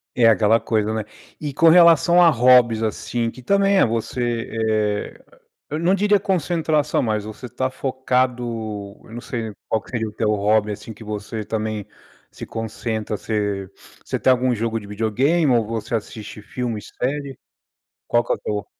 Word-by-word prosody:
E 120 - +1
é - - +8
aquela 110 +2 +4
coisa, 110 -1 0
né? 110 -1 -2 0.4
E 145 -2 -4
com 165 +3 +5
relação 170 0 +6
a 170 - +7
hobbies, 120 -3 +5
assim, 115 +2 -2
que 130 - -13
também 200 +8 +3
é - - +5
você, 115 +1 -2 0.2
eh, 105 -1 -1 0.5
eu 150 +2 -3
não 180 +3 +3
diria 205 +1 +3
concentração, 160 -5 0
mas 110 -3 -1
você 110 +4 -8
tá 130 +2 -2
focado. 130 -1 -1 0.6
Eu - - -15
não 120 - -6
sei 115 -4 -5 0.2
qual 110 - +1
que - - -18
seria 115 -3 -2
o - - -11
teu 105 +1 -1
hobby, 105 0 +2
assim, 110 +2 -9
que 105 - -18
você 105 0 -5
também 110 -2 -3 0.4
se - - -9
concentra. 110 -1 -4
Você 105 -3 -2 0.3
você - - -3
tem - - +2
algum 125 0 +2
jogo 115 -1 -2
de 100 - -11
videogame 130 +10 +1
ou 115 -3 +2
você 115 +1 -3
assiste 105 0 -6
filme 120 0 -4
e - - -13
série? 140 +1 -4 0.7
Qual 120 - +2
que - - -1
é - - -6
teu 105 -1 -4
115 Hz, 180 wpm, -21 LUFS, 110-130 Hz, 0.7 s, é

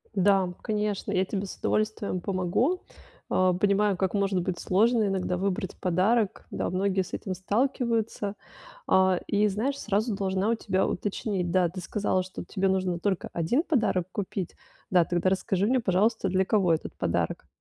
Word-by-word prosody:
Да, 190 -2 +3
конечно, 210 -2 -2
я 185 - +2
тебе 195 +1 -3
с - - -7
удовольствием 215 -4 -1
помогу. 195 - 0 0.5
Э, 185 -1 +3
понимаю, 200 -1 +2
как 190 0 0
может 195 -2 +1
быть 175 0 -3
сложно 220 +3 +3
иногда 185 -2 -1
выбрать 190 0 -2
подарок. 190 +4 +1
Да, - - -2
многие 190 +1 +1
с - - -13
этим 190 - -3
сталкиваются. 220 0 -1 0.6
Э, 185 -1 +4
и 205 +1 +3
знаешь, 245 +8 -1
сразу 215 +1 0
должна 195 +1 0
у - - +3
тебя 190 -4 0
уточнить. 190 -2 -2
Да, 180 0 +3
ты 185 +2 -7
сказала, 185 0 0
что 185 -1 -8
тебе 190 +2 -1
нужно 185 -2 0
только 190 0 -1
1 170 - +1
подарок 220 - +1
купить. 195 -2 -4 0.3
Да, 180 -2 +5
тогда 175 +2 +1
расскажи 190 +1 0
мне, 255 +1 +2
пожалуйста, 205 +1 +1
для 190 +1 +2
кого 190 -4 +2
этот 160 - -5
подарок? - - -1
195 Hz, 165 wpm, -27 LUFS, 185-210 Hz, 0.6 s, Да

